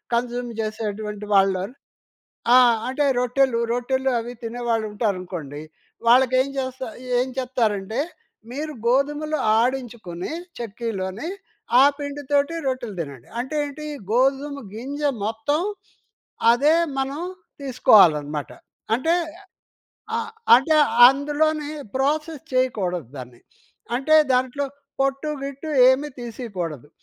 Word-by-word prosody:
Consume 245 0 -2
చేసేటువంటి 210 -1 -4
వాళ్ళు 195 -1 +3 0.9
ఆ! - - +9 0.3
అంటే 285 +3 0
రొట్టెలు 250 0 +2
రొట్టెలు 260 +2 0
అవి 235 +2 -6
తినేవాళ్ళు 230 -1 -1
ఉంటారనుకోండి. 180 - -3 0.5
వాళ్ళకి 255 +1 +5
ఏం 265 - -1
చేస్తా 260 -1 -4 0.3
ఏం 250 - +1
చెప్తారంటే, 225 -3 -1 0.5
మీరు 300 +4 -4
గోధుమలు 295 +5 +1 0.2
ఆడించుకొని 235 -8 -2 0.3
చెక్కీలోని, 220 - -4 0.5
ఆ - - +8
పిండితోటి 285 +1 -1
రొట్టెలు 250 -5 -3
తినండి. 140 -6 -7
అంటేంటి 290 +3 -3 0.3
గోధుమ 275 +3 +1
గింజ 275 +7 -6 0.2
మొత్తం 225 +8 0 0.9
అదే 280 +6 +4 0.2
మనం 270 +2 -2 0.4
తీసుకోవాలనమాట. 165 - +4 0.5
అంటే 320 +8 +1 1.0
ఆహ్, 450 -1 -3 0.3
అంటే 310 +5 +2 0.3
అందులోనే 295 +2 0 0.3
ప్రాసెస్ 305 +3 -1
చేయకూడదు 190 - 0
దాన్ని. 125 -2 -10 0.6
అంటే 310 +5 +4 0.2
దాంట్లో 255 +3 +1 0.3
పొట్టు 275 +2 0 0.2
గిట్టు 280 +3 -6 0.2
ఏమీ 270 +3 +2
తీసేయకూడదు. 190 - -6
250 Hz, 95 wpm, -23 LUFS, 215-280 Hz, 1.0 s, ఆ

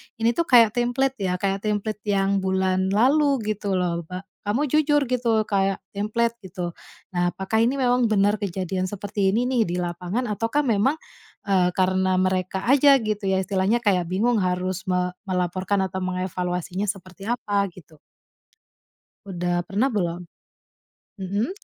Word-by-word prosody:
ini 230 +1 +2
tuh 335 +7 -1
kayak 230 -4 +6
template 245 +2 0
ya, 185 -2 0
kayak 195 +1 -1
template 210 0 -2
yang 195 -1 +2
bulan 190 0 0
lalu 275 +8 +3 0.2
gitu 200 -2 -2
loh, 175 -2 0
ba 185 +1 -6 0.2
kamu 230 +9 0
jujur 295 -2 +3
gitu 235 -3 +1
kayak 195 -1 +1 0.2
template 230 +3 0
gitu? 180 -2 -5 0.4
Nah 175 0 +1
apakah 190 +5 -1
ini 255 +4 +2
memang 245 -2 +2
benar 205 +1 +2
kejadian 185 -1 -2
seperti 205 0 -1
ini 230 +5 +1
nih 250 -3 +2
di 175 - -2
lapangan, 180 +7 -2
ataukah 230 +7 -1
memang, 235 +6 +2 0.5
eee, 185 -3 +3
karena 185 0 +2
mereka 185 0 0
aja 275 +2 +6
gitu 215 -1 -2
ya, 190 - +2
istilahnya 195 +4 +1
kayak 180 -4 +2
bingung 220 +4 +1
harus 185 0 -2
me 180 0 0 0.2
melaporkan 185 +2 0
atau 190 0 -4
mengevaluasinya 185 +1 -2
seperti 195 +1 -7
apa 205 -5 0
gitu. 160 -3 -16 1.3
Udah 175 -2 -2
pernah 215 +9 +1
belum? 175 -6 -2 1.0
Mhm. 200 - -2
195 Hz, 145 wpm, -24 LUFS, 185-225 Hz, 1.3 s, kayak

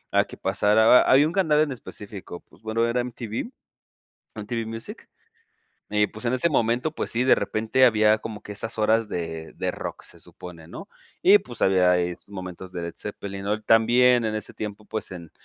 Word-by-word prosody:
a - - +4
que - - -11
pasara 110 +2 +2
ba 125 - +8
había 135 +3 +5
un 160 - -2
canal 160 -6 +2
en 145 - -1
específico 105 -7 -8
pues 85 +7 -22
bueno 115 +1 0
era 120 +1 0
MTV, 120 - -5 0.8
MTV 110 +2 -4
Music 115 0 -7 0.8
y 105 -1 +2
pues 110 +3 -10
en 120 - +1
ese 130 +7 +2
momento 120 +2 +1
pues - - -4
sí 120 - +1
de 130 - +5
repente 115 +4 +1
había 110 -2 +4
como 105 -1 -8
que - - -11
esas 110 +2 -5
horas 110 +1 +2
de 80 -3 -5
de - - -2
rock - - -7
se - - -11
supone, 85 -3 -11
¿no?, - - -10 0.3
y 200 +3 +7
pues 125 -11 -7
había 90 -2 +4
ahí 90 -1 0
sus - - -8
momentos 95 -1 -8
de 90 - -5
Led 85 0 -6
Zeppelin, 100 -1 -6
¿no?, 105 +2 -1
también 120 +2 +4
en 110 0 -1
ese 105 -1 -5
tiempo 105 0 -7
pues 110 -2 -5
en 85 -3 -9
110 Hz, 200 wpm, -24 LUFS, 100-120 Hz, 0.8 s, ba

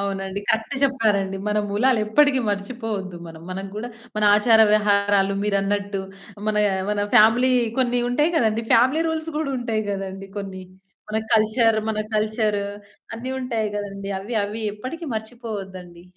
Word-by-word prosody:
అవునండి. 195 0 -3
కరెక్ట్ 225 +5 0
చెప్పారండి. 210 -8 +1
మన 210 - +1
మూలాలు 230 +4 +2
ఎప్పటికీ 275 +3 +4
మర్చిపోవద్దు 200 -2 -4
మనం. 160 -1 -11
మనం 190 +1 -4
గూడా, 230 +3 -5 0.3
మన 215 - +1
ఆచార 220 +1 +5
వ్యవహారాలు 200 -2 +3
మీరన్నట్టు, 200 0 0 0.5
మన 215 - 0 0.4
మన 210 - -1 0.2
ఫ్యామిలీ 240 +4 +6 0.3
కొన్ని 245 -1 +2
ఉంటాయి 295 +7 +1
గదండీ 225 -4 +1
ఫ్యామిలీ 260 +7 +4
రూల్స్ 320 0 -2
గూడా 285 -3 -2
ఉంటాయి 225 -3 -1
గదండీ 195 0 -5
కొన్ని. 190 -2 -6 0.5
మన 215 - -2 0.2
కల్చర్ 220 +1 +3
మన 215 -1 -1 0.2
కల్చరు, 215 -1 0 0.5
అన్నీ 240 +3 -5
ఉంటాయి 230 -4 -1
గదండీ. 200 -1 -5
అవి 225 +4 -6
అవి 215 +2 -5
ఎప్పటికీ 290 +10 -7
మర్చిపోవద్దండి 200 -6 -7
215 Hz, 135 wpm, -23 LUFS, 200-240 Hz, 0.5 s, ఫ్యామిలీ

